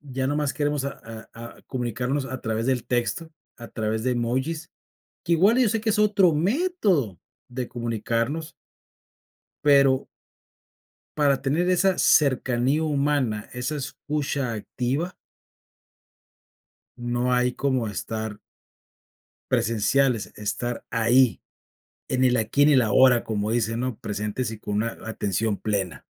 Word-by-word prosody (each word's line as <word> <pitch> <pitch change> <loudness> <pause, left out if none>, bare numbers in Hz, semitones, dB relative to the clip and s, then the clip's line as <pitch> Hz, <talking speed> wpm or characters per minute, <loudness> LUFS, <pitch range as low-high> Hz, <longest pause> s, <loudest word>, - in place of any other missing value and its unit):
ya 130 0 0
nomás 145 0 0
queremos 145 -2 -1
a 140 - -7 0.3
a 115 +1 -10
comunicarnos 125 +2 -2
a 130 0 -6
través 110 0 -2
del 130 -3 0
texto, 125 +7 -1 0.3
a 120 -1 -9
través 110 0 -2
de 130 - +2
emojis, 130 +7 -2 0.5
que 170 - 0
igual 195 +8 +4
yo 250 -3 +4
sé 225 - 0
que 220 - -3
es 210 - 0
otro 200 -5 +4
método 190 - +1 0.3
de 125 0 -5
comunicarnos. 120 +6 -2 1.1
Pero 140 -2 +4 1.1
para 140 -3 +2
tener 155 +6 +1
esa 185 +1 +2
cercanía 130 0 +3
humana, 140 -7 0
esa 125 +4 -3
escucha 140 -2 -3
activa 130 - -3 1.8
no 120 +1 -1
hay 125 0 +2
como 130 -4 0
estar 110 +2 -5 1.1
presenciales, 115 +2 +1
estar 120 +3 -3
ahí 115 +2 +3 0.7
en 130 0 +1
el 125 -1 +3
aquí, 115 +6 +1
y - - +7
en - - +5
el 135 -4 +5
ahora 120 +2 +4
como 105 -1 -2
dicen, 115 0 0
¿no? 125 -3 -3
Presentes 105 +3 -3
y 110 - -7
con 105 -1 -4
una 115 +2 -1
atención 105 -1 -1
plena. 95 -8 -2
125 Hz, 130 wpm, -25 LUFS, 115-145 Hz, 1.8 s, y